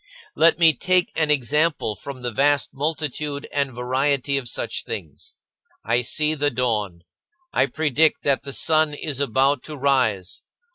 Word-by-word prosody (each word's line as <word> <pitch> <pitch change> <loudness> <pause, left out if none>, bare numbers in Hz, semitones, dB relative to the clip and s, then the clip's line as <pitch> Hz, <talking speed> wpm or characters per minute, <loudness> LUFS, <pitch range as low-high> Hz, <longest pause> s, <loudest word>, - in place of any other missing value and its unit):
Let 165 -1 +4
me 165 -2 +6
take 180 +5 +1
an 155 -2 +1
example 150 -3 +1
from 130 0 -9
the 120 - -2
vast 140 +4 +1
multitude 150 0 -3
and 140 -2 -1
variety 130 +3 0
of 125 -3 -7
such - - -3
things. 445 - -8 0.5
I 120 +2 +2
see 150 +5 +1
the 145 -1 0
dawn; 105 -9 -2 0.5
I - - +2
predict 155 0 +1
that 140 -2 +1
the 140 0 -7
sun 155 +1 +2
is 145 -2 -4
about 135 +1 +1
to 155 -1 -7
rise. 125 -9 0
140 Hz, 150 wpm, -22 LUFS, 125-150 Hz, 0.5 s, me